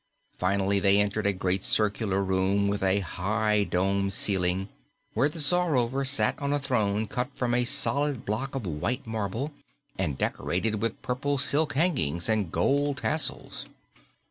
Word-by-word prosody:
Finally, 100 +1 +1
they 100 0 +4
entered 105 0 0
a - - +3
great 95 0 -1
circular 100 -2 +1
room 95 +1 +1
with 100 0 -1
a 95 +1 +2
high, 105 +4 0
domed 100 +1 0
ceiling, 95 -1 0 0.5
where 145 - +2
the 155 - -10
Czarover 145 -5 +1
sat 140 +1 +1
on 140 0 -1
a 145 - +2
throne 110 -6 0
cut 125 +5 -3
from 120 -1 -1
a 120 0 +2
solid 140 0 +3
block 130 +6 -3
of 130 -6 -3
white 85 +9 -3
marble 110 +5 -3 0.5
and 75 -8 -1
decorated 105 +4 -1
with 115 -2 -1
purple 140 +3 -1
silk 145 +3 +2
hangings 130 - 0
and 105 -6 0
gold 140 - +1
tassels. 155 0 -1
105 Hz, 150 wpm, -27 LUFS, 95-135 Hz, 0.5 s, they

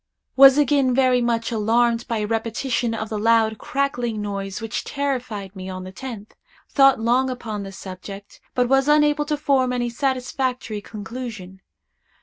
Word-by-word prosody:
Was 270 0 +8
again 275 -3 +3
very 255 -2 +3
much 230 -1 0
alarmed 230 +2 +1
by 230 - -1
a 210 - -1
repetition 230 +2 -1
of 220 -1 -4
the 215 - -3
loud, 220 0 +2
crackling 245 -5 -2
noise 200 -1 -4
which 225 -1 -4
terrified 250 -9 -3
me 190 0 -7
on 185 0 -6
the 185 - -8
tenth. 225 -1 -8 0.4
Thought 270 -3 +5
long 245 +4 +2
upon 225 -5 -5
the 195 -1 -7
subject, 195 +1 -10
but 250 -1 +2
was 270 +2 +3
unable 295 0 +3
to 300 0 -1
form 270 -4 +1
any 240 -1 -1
satisfactory 255 -3 -2
conclusion. 210 -3 -8
235 Hz, 155 wpm, -22 LUFS, 210-265 Hz, 0.4 s, Was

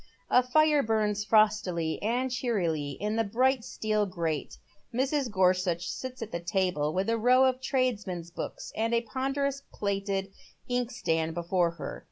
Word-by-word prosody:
A 250 - +7
fire 300 +3 +4
burns 215 -3 0
fi'ostily 205 -7 +2
and 250 +4 0
cheerily 170 - -1
in 210 +2 -1
the 225 - +3
bright 250 +4 +2
steel 215 -2 -1
grate. 165 -5 -3 0.3
Mi 250 +3 +1
s. 275 -1 0
Gorsuch 185 -4 +1
sits 255 +2 -5
at 225 - -9
a 170 - -1
table, 175 -3 0
with 190 +4 -1
a 230 0 +1
row 250 +3 +5
of 260 0 +1
tradesmen's 210 - -1
books - - -6
and 225 +2 +1
a 230 - +2
ponderous 270 +4 -2
plated 195 -1 -2 0.4
inkstand 230 -11 -1
before 175 0 +1
her. 170 - -6
215 Hz, 155 wpm, -29 LUFS, 180-250 Hz, 0.4 s, A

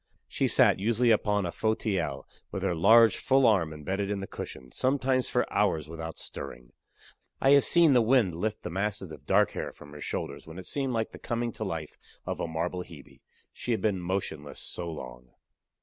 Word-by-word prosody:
She - - 0
sat, - - +5
usually, 115 +3 +2
upon 105 -2 +2
a 85 - -2
fauteuil, 105 -5 -1 0.3
with 95 - -4
her 95 -2 +1
large, 110 +7 +6
full 135 0 +3
arm 95 -8 +3
embedded 95 +7 -3
in 100 -1 -1
the 95 - -4
cushion, 65 -8 -8
sometimes 130 -1 +1
for - - +1
hours 75 -2 +1
without 80 0 -7
stirring. - - -8 0.7
I 135 - +4
have 140 -1 +7
seen 170 -4 +5
the 125 - +5
wind 115 -5 +3
lift 105 +6 -3
the 90 - -5
masses 100 -1 -2
of - - -12
dark - - +4
hair - - -4
from 75 - -14
her 75 0 -10
shoulders - - -4
when 80 +2 -10
it 95 - -8
seemed 135 +4 -2
like 115 -1 -1
the - - -11
coming 120 0 -2
to - - -5
life 80 -2 -5 0.3
of - - -3
a - - -2
marble 85 +3 -2
Hebe 80 -6 -14 0.3
she 120 - -2
had 110 - -1
been 105 -4 +1
motionless 85 -5 -3
so 85 -1 -4
long. 60 -5 -9
95 Hz, 195 wpm, -28 LUFS, 80-115 Hz, 0.7 s, have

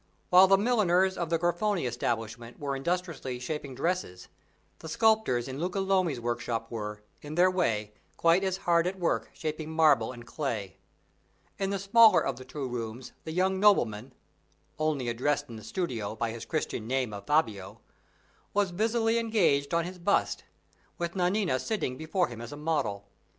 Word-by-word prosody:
While 185 +1 +8
the 195 +1 +6
milliners 190 -4 +2
of 170 -2 -3
the 165 - +2
Grifoni 175 +1 0
establishment 115 -1 -3
were 140 -1 -2
industriously 165 -3 -3
shaping 135 +1 -5
dresses, 165 - -2 0.5
the 160 - -8
sculptors 215 - +2
in 135 +1 -6
Luca 180 +4 -2
Lomi's 185 -8 +1
workshop 115 -1 -3
were, 105 -2 -5 0.2
in 150 +1 -7
their 180 +2 +5
way, 110 - 0 0.2
quite 170 +3 +4
as 190 -1 0
hard 170 0 +3
at 190 +1 -3
work 175 -2 0
shaping 155 0 -4
marble 150 -8 +3
and 120 -2 -11
clay. 115 - -4 0.8
In 195 -1 0
the 200 - -1
smaller 215 +3 +6
of 135 -3 -2
the 130 - -10
two 135 0 -5
rooms 120 0 -5
the 160 - -4
young 190 +3 +1
nobleman 125 - +3 0.7
(only 155 -5 0
addressed 130 +5 0
in 115 - -8
the 110 - -10
studio 115 - -3
by 115 0 -2
his 115 0 -7
Christian 135 -8 -3
name 130 -3 -1
of 100 0 -8
Fabio) 110 -9 0 0.8
was 200 -3 +2
busily 225 +4 +1
engaged 190 -12 +2
on 170 -1 +1
his 180 +1 -8
bust, 200 +4 +1 0.5
with 170 0 -3
Nanina 180 -5 +1
sitting 200 - -2
before 160 +5 0
him 120 -1 -9
as 120 - -8
a 145 - -7
model. 150 -11 -1
155 Hz, 165 wpm, -29 LUFS, 120-185 Hz, 0.8 s, While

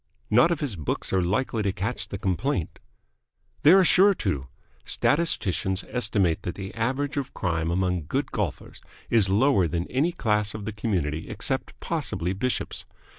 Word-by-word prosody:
"Not 125 +9 +6
if 170 -3 -1
his 135 -9 -2
books 75 +2 -3
are 95 - +3
likely 110 +5 0
to 100 -2 +1
catch 100 +5 -3
the 100 - -5
complaint." 95 - -2 0.8
"They 150 - +7
are 190 0 +7
sure 195 +3 +5
to. 70 - -2 0.4
Statisticians 105 - +1
estimate 105 -8 +1
that 90 - -4
the 95 -1 -7
average 135 +6 -1
of 135 -1 -3
crime 85 -3 -1
among 90 -3 0
good - - -1
golfers - - -4 0.3
is 110 -5 +4
lower 100 -2 +3
than 85 +1 -1
in - - -14
any 155 +7 +3
class 105 - 0
of 105 -2 -6
the 110 - -4
community 85 -8 -2
except - - -3
possibly 90 +2 -1
bishops. 125 +6 -2
105 Hz, 165 wpm, -26 LUFS, 90-130 Hz, 0.8 s, They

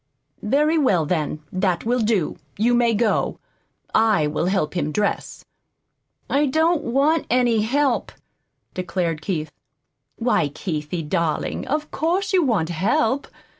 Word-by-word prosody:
"Very 300 +8 +2
well, 190 - +2
then, 155 -2 -2
that 185 -1 0
will 245 +2 +1
do. 215 -7 0 0.2
You 230 +4 +2
may 240 -2 +3
go. 215 0 +1 0.6
I 215 -8 +3
will 150 +3 -1
help 190 -5 0
him 155 -4 -1
dress." 205 +6 -2 0.8
"I 290 +2 +2
don't 320 +4 +2
want 280 +6 +1
any 240 -2 +3
help," 265 +3 +1 0.6
declared 175 -3 -2
Keith. 155 -3 -3 0.6
"Why, 230 -9 +1
Keithie, 155 +1 -4
darling, 170 -2 -1
of 300 +2 -2
course 350 +7 -1
you 370 - +5
want 205 - +1
help! 220 - +1
215 Hz, 130 wpm, -22 LUFS, 170-270 Hz, 0.8 s, you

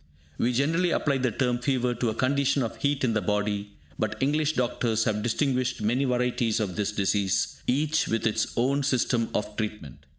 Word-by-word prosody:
We 120 - +2
generally 160 +8 +1
apply 140 -4 +1
the 130 -1 +1
term 120 +2 0
"fever" 125 -1 0
to 120 0 -1
a 110 - -3
condition 140 +2 +1
of 115 - -4
heat 140 -1 0
in 120 -3 +2
the 110 - +1
body, 105 +1 -1 0.3
but 110 0 -1
English 150 +3 +1
doctors 120 -4 0
have 105 -1 0
distinguished 130 +2 0
many 125 +6 +1
varieties 125 -3 0
of 100 -5 -2
this 105 0 -1
disease, 100 -2 0
each 150 +4 +1
with 115 - -1
its 110 - 0
own 135 +4 +2
system 125 -4 +1
of 105 0 -2
treatment. 105 - -5
120 Hz, 185 wpm, -26 LUFS, 110-135 Hz, 0.3 s, We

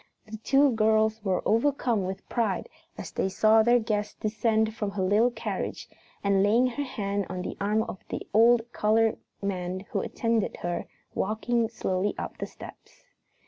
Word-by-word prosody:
The 215 +1 -8
two 275 +5 +3
girls 220 -1 +2
were 190 -3 0
overcome 230 -3 +1
with 190 +1 -6
pride 230 - -1 0.3
as - - -7
they 190 - -1
saw 215 +3 +4
their 240 +2 +5
guest 215 -3 -2
descend 220 0 +1
from 210 -2 -3
her 200 -1 -2
little 210 +6 +4
carriage 245 - -4 0.4
and, 200 -1 +3
laying 220 +5 +4
her 255 +3 -2
hand 200 -6 -3
on 180 0 -4
the - - -5
arm 210 +2 +2
of 190 - -7
the - - -4
old 230 +2 +5
colored 220 +1 +2 0.2
man 185 -1 -2
who - - 0
attended 230 -3 -1
her, 175 0 -2 0.3
walk 215 +3 -2 0.2
slowly 190 -3 -1
up - - -6
the - - -3
steps. - - -13
215 Hz, 165 wpm, -27 LUFS, 200-230 Hz, 0.4 s, their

